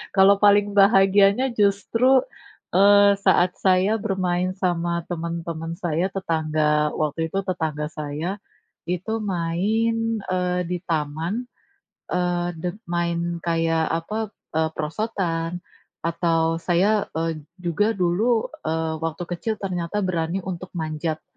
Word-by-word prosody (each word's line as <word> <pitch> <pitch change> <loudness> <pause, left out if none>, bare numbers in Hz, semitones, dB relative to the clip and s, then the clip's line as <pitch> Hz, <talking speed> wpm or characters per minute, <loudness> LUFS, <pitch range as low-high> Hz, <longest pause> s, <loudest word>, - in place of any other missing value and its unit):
Kalau 195 +1 +7
paling 205 0 +6
bahagianya 195 +3 +5
justru, 230 +6 +3 0.6
eee, 200 +1 +7
saat 185 -1 +4
saya 190 +1 +4
bermain 185 -3 0
sama 175 -2 0 0.2
teman-teman 165 -1 -4
saya, 170 +2 +1
tetangga, 155 -4 0
waktu 155 +1 -1
itu 195 - 0
tetangga 155 -4 -2
saya, 150 +1 -5 0.6
itu 180 +5 -3 0.2
main, 220 +7 0
eee, 180 -1 0
di 180 - -1
taman, 165 +9 -2 0.6
eee, 175 -1 0
d - - -11 0.3
main 170 0 -1
kayak 165 -1 +1
apa 190 +6 -5 0.3
eee, 160 0 +1
perosotan 170 0 -2 0.4
atau 165 -1 +1
saya, 195 +5 +2
eee, 165 -1 -1 0.2
juga 180 +2 0
dulu, 200 +6 +1 0.2
eee, 160 0 -1
waktu 165 +1 -3
kecil 215 +6 -2
ternyata 185 +2 -2
berani 175 0 -1
untuk 185 0 -5
manjat, 155 -1 -3
175 Hz, 110 wpm, -23 LUFS, 165-195 Hz, 0.6 s, Kalau